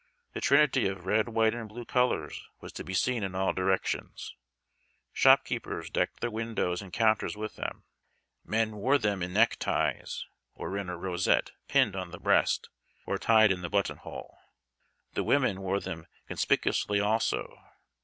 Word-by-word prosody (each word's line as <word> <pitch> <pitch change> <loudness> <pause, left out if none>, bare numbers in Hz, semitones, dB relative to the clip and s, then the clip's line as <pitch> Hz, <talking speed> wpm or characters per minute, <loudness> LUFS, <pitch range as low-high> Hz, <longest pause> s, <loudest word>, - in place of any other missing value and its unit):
The - - -5
trinity 140 -5 +4
of 95 -2 -5
red, 110 +4 +2
white, 110 -1 +2
and 115 -2 -6
blue 120 +3 -8
colors 125 - 0
was - - -10
to - - -6
be 95 - -5
seen 125 +4 +1
in 95 -2 -3
all 95 0 +1
directions. 95 0 -2 0.8
Shopkeepers - - +2
decked - - -1
their 120 - -1
windows 110 -5 -2
and 95 -2 -11
counters 110 0 +1
with 110 0 -5
them. - - -5 0.6
Men 110 -1 -1
wore 130 +8 +3
them 105 -6 -1
in 90 +1 -3
neck 110 +4 +4
ties, - - -1 0.3
or 95 - -5
in 100 -2 -3
a 90 - -4
rosette 90 +1 +1 0.2
pinned 100 - +3
on 95 -2 -4
the 90 - -9
breast, - - +2 0.4
or - - -2
tied 110 -2 +5
in 90 -1 -1
the 90 - -4
button 100 -1 0
hole. - - -10 0.7
The - - -1
women 125 -9 +2
wore 95 +1 0
them 80 -4 -7 0.2
conspicuously 105 -1 +1
also. 110 +2 0
105 Hz, 165 wpm, -29 LUFS, 95-115 Hz, 0.8 s, tied